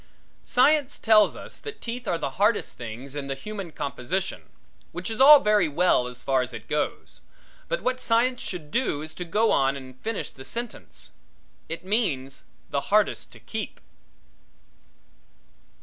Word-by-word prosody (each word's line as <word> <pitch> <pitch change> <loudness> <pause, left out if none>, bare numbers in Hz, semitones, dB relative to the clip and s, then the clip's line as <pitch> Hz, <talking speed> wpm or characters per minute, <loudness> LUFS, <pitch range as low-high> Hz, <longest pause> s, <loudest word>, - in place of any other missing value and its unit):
Science 285 +2 +3
tells 215 -2 +5
us - - -9
that 435 0 -7
the - - -30
teeth 240 0 -6
are 170 - +1
the 140 -4 -3
hardest 210 +1 +2
things 120 +4 -7
in 145 -1 -4
the 135 - -2
human 195 +3 -7
composition, 170 +7 -3 0.4
which - - -4
is 225 +3 -2
all 290 +2 +11
very 210 -6 +3
well 150 -4 +2
as 125 0 -9
far 135 -1 +2
as 125 - -4
it - - -8
goes, 150 0 -3 0.5
but - - -2
what 255 0 0
science 245 +1 +2
should 155 -5 -6
do 195 - 0
is 155 - -7
to 180 - -5
go 210 +6 +2
on 135 0 +2
and 130 -1 -12
finish 225 -2 -3
the 130 - -12
sentence. 235 - -7 0.6
It 165 +2 -5
means 155 - -1 0.3
the - - 0
hardest - - +2
to - - -13
keep. - - -6
185 Hz, 165 wpm, -26 LUFS, 140-230 Hz, 0.6 s, all